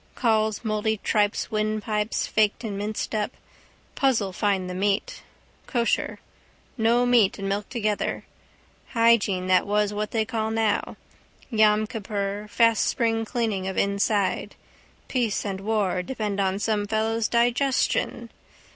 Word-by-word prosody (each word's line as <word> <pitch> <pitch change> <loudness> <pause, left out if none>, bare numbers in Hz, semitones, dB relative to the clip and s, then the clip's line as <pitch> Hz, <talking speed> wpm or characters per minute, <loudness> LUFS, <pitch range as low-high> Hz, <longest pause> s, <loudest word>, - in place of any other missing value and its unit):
Cauls 220 -2 +1
mouldy 215 0 0
tripes 210 +1 +1
windpipes 215 0 -1
faked 215 +2 +1
and 210 -3 -4
minced 210 +3 -3
up. 210 -1 -2 0.6
Puzzle 225 -8 +1
find 195 -2 0
the 180 - -5
meat. 195 +2 -1 0.5
Kosher. 235 -3 0 0.6
No 235 +1 +3
meat 240 -5 +4
and 195 - -4
milk 200 +1 -2
together. 215 -4 -2 0.7
Hygiene 230 -6 +3
that 185 +1 +3
was 210 0 +1
what 210 0 -2
they 220 -2 0
call 220 -1 -2
now. 220 -1 0 0.5
Yom 215 -1 +4
Kippur 205 -2 -4
fast 230 0 +3
spring 225 -2 0
cleaning 220 -5 -2
of 190 - -4
inside. 200 0 0 0.5
Peace 235 -6 -1
and 195 -1 -3
war 200 -3 0
depend 210 -1 -3
on 190 -1 +1
some 210 0 -1
fellow's 220 +1 0
digestion. 245 +3 +1
215 Hz, 130 wpm, -25 LUFS, 200-225 Hz, 0.7 s, meat